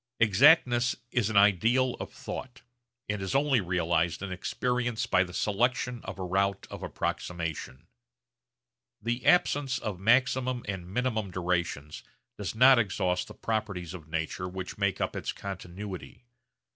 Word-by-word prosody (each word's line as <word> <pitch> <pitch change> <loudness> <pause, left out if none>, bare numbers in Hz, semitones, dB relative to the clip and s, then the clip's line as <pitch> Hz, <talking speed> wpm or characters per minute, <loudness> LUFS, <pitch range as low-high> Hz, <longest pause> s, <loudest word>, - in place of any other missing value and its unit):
Exactness 120 - +5 0.2
is 120 -4 +1
an 110 - 0
ideal 115 +6 +4
of - - -6
thought, 130 0 -7 0.4
and 105 -2 -2
is 95 +6 -3
only 135 -4 +3
realised 85 -1 0
in 100 - -4
experience 120 +5 -1
by 95 -6 +3
the 90 - -9
selection 120 +5 0
of - - -6
a 95 - -4
route 100 +2 0
of - - -7
approximation. 85 -6 -4 1.1
The 120 +3 -2
absence 145 -6 +3
of 105 -7 -4
maximum 125 +3 +2
and 95 -3 -5
minimum 110 -2 -1
durations 85 -5 -2 0.3
does 105 -1 -5
not 130 +2 +7
exhaust 90 -4 0
the - - -11
properties 100 -6 -3
of 80 -4 -9
nature 85 +3 -3
which 95 0 -6
make 100 -2 0
up - - -2
its - - -2
continuity. 95 - -8
100 Hz, 140 wpm, -29 LUFS, 90-120 Hz, 1.1 s, not